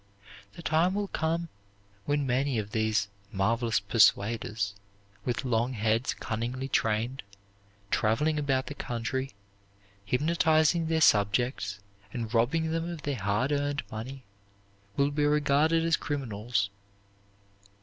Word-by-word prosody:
The 170 - -11
time 165 +5 +2
will 205 -1 -1
come 165 +1 -1 0.6
when 145 -1 +1
many 130 0 +1
of 105 -1 -3
these 110 -2 +1 0.2
"marvelous 115 +3 +1
persuaders," 105 0 +2 0.5
with 125 +2 -1
long 120 +1 +1
heads 110 +2 0
cunningly 120 +4 -3
trained, 115 +1 0 0.7
traveling 150 +8 +2
about 135 -2 +1
the - - -6
country, 130 +1 -3 0.7
hypnotizing 160 - +2
their 160 0 +1
subjects 105 -2 +2 0.3
and 115 0 -4
robbing 160 +8 +2
them 165 +1 -1
of 165 -4 -6
their 145 -1 -1
hard 105 +7 +1
earned 145 0 0
money, 130 +5 -6 0.7
will 140 +1 +3
be 145 +1 0
regarded 150 +2 +3
as 165 0 +3
criminals. 115 -7 -2
130 Hz, 120 wpm, -29 LUFS, 110-150 Hz, 0.7 s, will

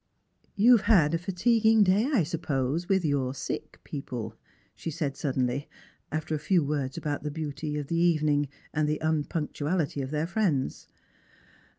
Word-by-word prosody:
" - - -39
You 235 +4 +7
have - - -6
had 165 -9 +5
a 165 - +1
fatiguing 220 +4 +3
day, 200 +4 +3
I 235 - +3
suppose, 155 -1 -2
with 190 -3 +2
your 135 -3 0
sick - - -5
people 125 -6 -5
P 110 - -29 0.2
" - - -37
she - - -5
said 150 -3 -2
suddenly, 130 -1 -1 0.4
after 155 0 -2
a 155 - 0
few 175 +2 +2
words 140 -2 -2
about 145 -1 -2
the 150 - -3
beauty 150 0 -4
of 145 - -3
the 165 +4 -1
evening 155 -4 +2 0.2
and 150 0 +1
the 150 - 0
tmpunctuality 155 0 -1
of 130 - -4
their 150 +2 -1
friends. 170 -7 -1
155 Hz, 175 wpm, -28 LUFS, 145-175 Hz, 0.4 s, You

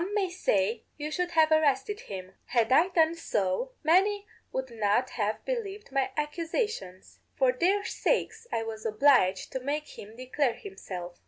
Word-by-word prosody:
_Some 390 +4 -3
may 385 -3 +1
say, 220 - +1 0.2
'You 300 0 -4
should 360 +2 -1
have 320 -1 +4
arrested 310 +5 +2
him.' 190 -1 -8
Had 235 -1 +1
I 320 +7 +6
done 330 -3 +3
so, 220 - -1
many 395 +6 +3 0.3
would 260 -1 -3
not 225 +3 +1
have 215 -1 -2
believed 420 - -4
my 270 -1 +1
accusations. 300 - -3 0.2
For 260 -2 +4
their 380 +10 +1
sakes - - -1
I 225 - 0
was 220 -1 -6
obliged 220 -4 +3
to 260 - -2
make 290 +3 -4
him 215 +2 -10
declare 255 0 0
himself. 180 - -8
280 Hz, 160 wpm, -29 LUFS, 220-355 Hz, 0.3 s, I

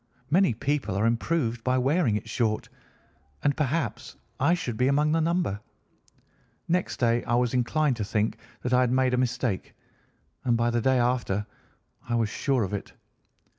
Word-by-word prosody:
Many 180 - +4
people 140 -3 -1
are 100 +3 +1
improved 120 0 0
by 130 0 +2
wearing 135 -2 +2
it 105 - -4
short 110 -3 -1 0.7
and 145 -1 +2
perhaps 140 -6 -2 0.2
I 170 - +4
should 145 -10 -4
be 125 +3 +2
among 150 +2 +2
the 165 +1 +2
number. 165 - 0 1.1
Next 180 +2 0
day 120 -1 +2
I 120 - +1
was 125 0 +1
inclined 130 +2 +1
to 110 - -2
think 105 +2 -1 0.3
that 125 - -1
I 125 - +5
had 125 -1 +2
made 130 0 +2
a - - +2
mistake, 125 -5 -1 0.7
and 120 -2 +2
by 120 +1 +1
the 120 0 +1
day 130 +2 +3
after 120 -5 0 0.6
I 120 - +1
was 115 -2 +1
sure 130 0 0
of 100 +1 -4
it. 100 - -5
125 Hz, 170 wpm, -27 LUFS, 115-145 Hz, 1.1 s, I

